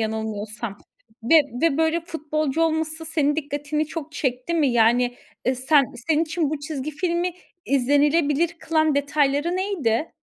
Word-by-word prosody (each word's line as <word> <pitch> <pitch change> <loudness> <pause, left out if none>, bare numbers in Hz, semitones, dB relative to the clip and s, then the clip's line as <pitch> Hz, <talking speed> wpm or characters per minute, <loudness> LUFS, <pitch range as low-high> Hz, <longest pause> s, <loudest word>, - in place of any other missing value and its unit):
yanılmıyorsam 220 -1 -4 0.5
ve 265 +8 +3 0.3
ve 320 -3 +2
böyle 320 +1 +2
futbolcu 310 -2 -2
olması 320 0 -1
senin 305 -2 0
dikkatini 295 0 -2
çok 315 -1 -7
çekti 260 +3 -2
mi? 310 -4 +3
Yani, 240 +2 +3 0.3
eee, 255 - +2
sen 275 +3 +4 0.2
senin 315 0 +3
için 320 -2 -1
bu 310 - -2
çizgi 290 0 -4
filmi 345 +3 -1 0.3
izlenilebilir 290 +4 +2
kılan 315 -2 +1
detayları 285 +4 +1
neydi? 330 - -1
295 Hz, 135 wpm, -23 LUFS, 265-320 Hz, 0.5 s, sen